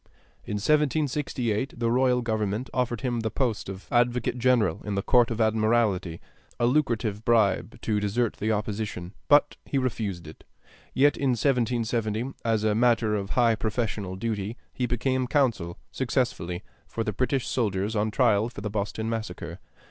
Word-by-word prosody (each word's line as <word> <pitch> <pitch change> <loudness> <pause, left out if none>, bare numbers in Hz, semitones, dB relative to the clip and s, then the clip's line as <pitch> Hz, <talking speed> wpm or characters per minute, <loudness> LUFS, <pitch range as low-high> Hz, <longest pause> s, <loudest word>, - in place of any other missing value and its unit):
In 105 - -3
1768 135 -2 0
the 115 -1 0
royal 125 0 +3
government 110 +1 -2
offered 125 -2 -1
him 125 -3 -1
the 110 0 -1
post 115 -5 -1
of 95 0 -7
advocate 120 0 +1
general 120 -8 +2
in 105 -1 -3
the 100 - -1
Court 120 -1 +4
of 115 -1 -3
Admiralty, 110 -6 +1 0.4
a 120 - +3
lucrative 115 -6 +1
bribe 110 -3 +2
to 105 -2 0
desert 105 +3 0
the 110 +2 0
opposition; 105 -3 -3
but 145 0 +4
he 140 - -2
refused 105 -9 -2
it. 80 - -12 0.5
Yet 145 +2 +4
in 135 -3 +1
1770, 120 -2 0
as 110 -2 +1
a 110 -1 +2
matter 115 -1 +3
of 100 -2 -2
high 120 -2 +5
professional 110 -4 -2
duty, 105 +2 -3 0.2
he 125 - -1
became 130 +2 0
counsel 115 - +1
(successfully) 105 -7 -1 0.2
for 115 - -3
the 105 -2 -2
British 130 +4 0
soldiers 105 -2 -1
on 105 +1 +1
trial 110 -1 +2
for 120 - -9
the 105 0 -4
"Boston 105 +1 -2
Massacre." 115 -1 -4
115 Hz, 155 wpm, -26 LUFS, 105-125 Hz, 0.5 s, high